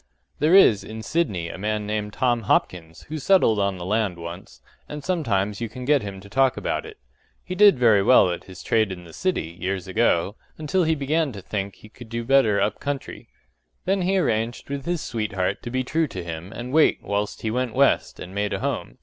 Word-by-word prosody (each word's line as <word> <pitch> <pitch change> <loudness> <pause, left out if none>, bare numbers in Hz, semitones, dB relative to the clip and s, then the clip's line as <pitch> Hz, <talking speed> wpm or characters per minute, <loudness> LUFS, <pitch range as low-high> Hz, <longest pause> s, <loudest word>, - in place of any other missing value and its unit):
There 155 +5 +4
is 115 - +6
in 110 0 -8
Sydney 105 - -1
a - - -8
man 105 +1 -2
named 105 0 -3
Tom 120 0 +1
Hopkins 80 -2 0
who 155 +1 -6
settled 145 - +3
on 100 -1 0
the 90 - -6
land 105 -2 0
once, 85 +2 -9 0.3
and 150 -1 -6
sometimes 105 - -1
you 115 - -3
can 125 +2 -8
get 145 0 +3
him 100 -2 -7
to 100 - -13
talk 130 +4 +2
about - - -2
it. - - -12 0.5
He - - -5
did 200 -2 +6
very 115 -5 +5
well 95 -4 +5
at 85 - -6
his 95 -1 -11
trade 110 -3 +2
in 90 -1 -7
the 85 -2 -14
city, 175 - -2
years 95 +2 -3
ago, 95 -1 +1 0.2
until 160 +4 0
he 160 0 +2
began 150 +1 0
to 100 - -8
think 100 0 -4
that - - -24
he 110 - -14
could 115 +1 -13
do 115 0 -3
better 115 -5 +3
up 100 +1 0
country. 140 -1 -5 0.6
Then 195 +1 +1
he 190 +2 +1
arranged 115 -5 -1
with 140 -1 -4
his 175 -3 -1
sweetheart 100 -4 -2
to - - -6
be 130 +1 -1
true 160 +5 0
to 95 -9 -6
him 85 +2 -7
and 120 +3 -7
wait 160 0 +4
whilst 100 0 -3
he 110 - -1
went 125 0 -2
west 140 +1 +2
and 90 - -8
made 100 +1 -1
a - - -2
home. - - -3
110 Hz, 220 wpm, -24 LUFS, 100-140 Hz, 0.6 s, is